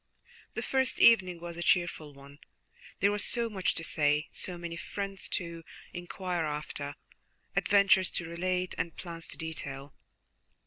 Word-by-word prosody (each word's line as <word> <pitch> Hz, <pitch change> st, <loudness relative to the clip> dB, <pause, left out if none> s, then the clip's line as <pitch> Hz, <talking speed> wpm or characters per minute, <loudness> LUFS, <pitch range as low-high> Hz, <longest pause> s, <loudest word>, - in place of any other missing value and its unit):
The -, -, -2 dB
first 265 Hz, -1 st, +1 dB
evening 185 Hz, -7 st, +6 dB
was 170 Hz, 0 st, -7 dB
a -, -, -4 dB
cheerful 175 Hz, -6 st, +2 dB
one, 140 Hz, +1 st, -14 dB, 0.6 s
there 200 Hz, -, +5 dB
was 205 Hz, 0 st, 0 dB
so 235 Hz, -2 st, 0 dB
much 190 Hz, -3 st, 0 dB
to 165 Hz, -, -3 dB
say, 150 Hz, 0 st, +2 dB
so 180 Hz, -1 st, -4 dB
many 170 Hz, -1 st, -5 dB
friends 195 Hz, +2 st, -4 dB
to 170 Hz, -2 st, -3 dB, 0.3 s
inquire 175 Hz, -1 st, -2 dB
after, 150 Hz, -1 st, -4 dB, 0.6 s
adventures 200 Hz, -2 st, +5 dB
to 175 Hz, -, -3 dB
relate, 180 Hz, +2 st, -1 dB
and 165 Hz, 0 st, -2 dB
plans 165 Hz, -2 st, -6 dB
to -, -, -6 dB
detail. 140 Hz, -4 st, -6 dB
170 Hz, 145 wpm, -31 LUFS, 160-190 Hz, 0.6 s, evening